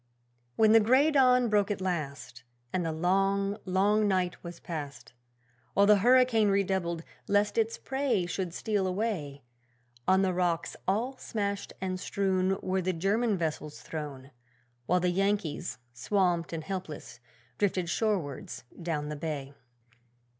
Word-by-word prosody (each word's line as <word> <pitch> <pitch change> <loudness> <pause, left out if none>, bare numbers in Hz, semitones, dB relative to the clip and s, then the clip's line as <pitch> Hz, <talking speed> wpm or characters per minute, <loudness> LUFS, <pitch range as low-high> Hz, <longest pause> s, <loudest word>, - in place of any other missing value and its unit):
When 220 -1 +5
the 225 - +8
grey 260 +8 +4
dawn 250 -3 +5
broke 210 -2 +2
at 205 - -2
last, 155 -8 -4 0.3
And 180 - 0
the 165 - -1
long, 195 +4 +1
long 205 +3 +2
night 185 -2 0
was 170 -1 -8
past, 145 -6 -7 0.6
While 200 - +5
the 210 0 +6
hurricane 240 -1 +4
redoubled, 190 -4 0 0.2
lest 205 +1 +2
its 225 0 +1
prey 265 -9 0
should 175 +1 -3
steal 200 +2 -1
away, 180 - -3 0.6
On 190 +1 +4
the 185 -1 +1
rocks, 175 -2 0
all 235 +8 0
smashed 200 -4 -3
and 185 -1 -3
strewn, 190 0 0
Were 190 0 0
the 185 +1 -1
German 200 +5 +1
vessels 155 -2 -4
thrown, 145 -4 -7 0.6
While 180 +1 +3
the 180 0 +2
Yankees, 195 -3 -1 0.2
swamped 175 +5 0
and 165 -1 -4
helpless, 190 0 -6 0.4
drifted 185 -3 +1
shorewards 170 - -2 0.2
down 155 -3 -2
the 150 - -4
bay. 145 -3 -5
190 Hz, 140 wpm, -29 LUFS, 170-210 Hz, 0.6 s, the